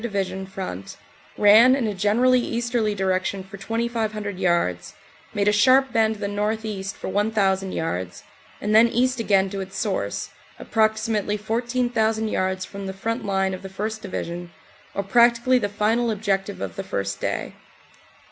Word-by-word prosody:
Division 195 -4 -3
front, 185 - -7 0.4
ran 220 +5 +7
in 265 -4 -1
a 210 - -1
generally 225 +6 +3
easterly 235 -3 -1
direction 190 0 -1
for 195 +1 -11
2,500 215 -2 -3
yards, 170 - 0 0.4
made 205 0 0
a - - +6
sharp 260 +6 +4
bend 220 -1 +2
to 210 - -13
the 200 - -1
northeast 205 -1 -3
for - - -7
1,000 195 -1 +1
yards, 90 - -4 0.4
and 210 +1 -1
then 225 +2 +7
east 250 +2 +1
again 195 -4 +3
to 200 - -4
its 190 0 -7
source, 190 - -2 0.3
approximately 215 -1 0
14,000 225 0 0
yards 185 -1 -1
from 200 0 -7
the 190 - -4
front 225 +4 -3
line 195 -1 0
of 185 - -6
the 195 - -8
1st. 215 +3 -4
Division, 175 -2 -5 0.5
or 200 - -1
practically 235 +4 +4
the 205 -3 -1
final 220 +4 +1
objective 200 -2 -1
of 95 -3 -5
the - - -3
first - - -3
day. - - -2
210 Hz, 155 wpm, -23 LUFS, 190-225 Hz, 0.5 s, ran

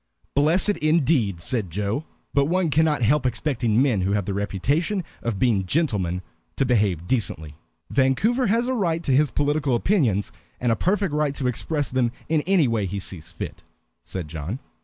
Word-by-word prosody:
"Blessed 170 +8 +2
indeed," 140 - +2
said 105 -1 0
Joe. 105 - -2 0.3
"But 140 -1 +3
one 175 +1 +1
cannot 150 -4 +2
help 135 +5 +3
expecting 120 -3 0
men 125 -8 +2
who 95 +2 0
have 105 -2 0
the 100 - -2
reputation 140 - -1 0.2
of 115 -4 -2
being 100 -4 +1
gentlemen 95 - 0 0.3
to 135 - +1
behave 105 -9 +1
decently." 90 - -2 0.4
"Vancouver 200 - +2
has 230 +4 +2
a 260 - 0
right 170 -8 0
to 135 -5 +2
his 150 +1 +4
political 145 -1 +1
opinions, 120 - +1 0.3
and 120 -1 +1
a - - +3
perfect 195 - 0
right 150 -2 0
to 130 -2 -2
express 145 +4 -2
them 125 -2 +1 0.2
in 155 -1 +2
any 185 -7 +4
way 110 -4 0
he 100 +3 -4
sees 95 -4 -6
fit," - - -7 0.4
said 90 -4 -6
John. 80 - -5
130 Hz, 175 wpm, -24 LUFS, 100-155 Hz, 0.4 s, his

